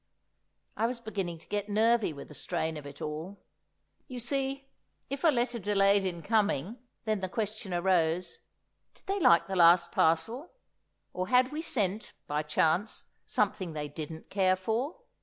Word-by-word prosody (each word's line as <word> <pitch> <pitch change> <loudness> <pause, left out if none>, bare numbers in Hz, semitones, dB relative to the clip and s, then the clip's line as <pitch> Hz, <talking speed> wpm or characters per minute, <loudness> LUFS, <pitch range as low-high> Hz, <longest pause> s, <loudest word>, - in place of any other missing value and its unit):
I 225 - +1
was 245 0 -4
beginning 195 -7 -4
to 160 - -16
get 205 0 -2
nervy 225 0 +3
with 140 -2 -10
the - - -10
strain 160 +2 -2
of 145 -2 -7
it 140 - -9
all. 160 +6 -6 0.6
You 255 -3 -6
see, 270 +2 -2 0.4
if 275 0 -4
a - - +6
letter 240 -4 +1
delayed 200 -1 +3
in 170 -3 -3
coming, 210 - +1 0.3
then 215 -2 0
the 185 - -2
question 210 -1 -3
arose: 175 -1 +1 0.6
Did - - -19
they 395 +1 -1
like 170 - +5
the 195 - -4
last 170 0 +6
parcel? 225 - +1 0.6
or, 185 0 -2
had 250 +2 +4
we 305 +1 -3
sent, 215 - -1
by 150 +1 -1
chance, 160 +6 0 0.2
something 180 -5 0
they 150 -1 -4
didn't 160 +1 -8
care 190 -2 +3
for? 230 - -2
195 Hz, 160 wpm, -30 LUFS, 170-235 Hz, 0.6 s, a